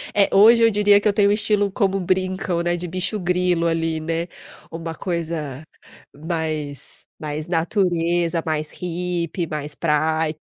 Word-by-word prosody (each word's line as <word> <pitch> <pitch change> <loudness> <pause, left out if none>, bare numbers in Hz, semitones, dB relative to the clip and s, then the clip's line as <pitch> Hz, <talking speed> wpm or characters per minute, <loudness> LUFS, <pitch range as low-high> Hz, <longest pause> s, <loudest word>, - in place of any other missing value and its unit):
É, 200 -1 +4
hoje 230 +3 +7
eu 230 - +6
diria 205 -1 +4
que - - 0
eu 205 - +3
tenho 200 0 +3
um - - +4
estilo 205 -1 +1
como 195 -1 0
brincam, 185 -1 -1
né 175 0 0
de 175 0 -5
"bicho-grilo" 180 -2 0
ali, 165 -1 -1
né. 165 +2 -2 0.4
Uma 165 0 -5
coisa 160 -5 -4 0.5
mais 155 -3 -5
mais 150 0 -4
natureza, 170 -1 0
mais 155 -1 -2
hippie, 175 -1 -3
mais 150 -1 -5
praia. 155 0 0
170 Hz, 145 wpm, -22 LUFS, 160-185 Hz, 0.5 s, hoje